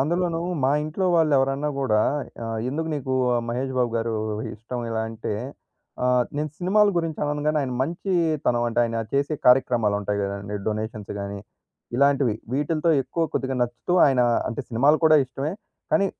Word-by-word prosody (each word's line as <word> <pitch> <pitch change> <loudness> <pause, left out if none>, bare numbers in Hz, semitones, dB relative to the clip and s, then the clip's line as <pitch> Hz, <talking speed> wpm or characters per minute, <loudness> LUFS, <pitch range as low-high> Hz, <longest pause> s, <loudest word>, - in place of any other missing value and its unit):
అందులోను 170 +3 0 0.2
మా 135 - +4
ఇంట్లో 155 +5 -2
వాళ్ళు 160 -2 +3
ఎవరన్నా 135 +2 0
కూడా, 110 -5 +2 0.4
ఆహ్, 115 0 -3
"ఎందుకు 160 +5 -2
నీకు 130 -2 -2 0.3
మహేష్ 130 +3 -2
బాబు 120 -2 +2
గారు 115 0 -1 0.4
ఇష్టం," 120 +3 -6
ఇలా 110 0 -1
అంటే 115 -1 -4 0.7
ఆహ్, 125 -1 +3
నేను 150 +1 -2
సినిమాల 205 +4 +4
గురించి 165 -2 -1
అనను 145 0 -2
గాని, 155 0 +2
ఆయన 130 - -3
మంచీతనం 160 -6 0
అంటే 115 - -3
ఆయన 115 0 -2
చేసే 140 +2 +1
కార్యక్రమాలుంటాయి 110 -5 +3
కదండీ! 100 +1 -4
డొనేషన్స్ 110 -1 -3
గానీ, 100 0 -5 0.6
ఇలాంటివి 140 -4 +3 0.2
వీటిలతో 155 +4 +1
ఎక్కువ 165 +5 -3
కొద్దిగా 130 0 -1
నచ్చుతూ 120 +8 -3
ఆయనా 130 -3 +3 0.2
అంటే 125 - -3
సినిమాలు 135 +6 +4
కూడా 155 -1 +7
ఇష్టమే. 135 +4 -4 0.4
కానీ, 195 -1 +4
135 Hz, 150 wpm, -24 LUFS, 115-155 Hz, 0.7 s, కూడా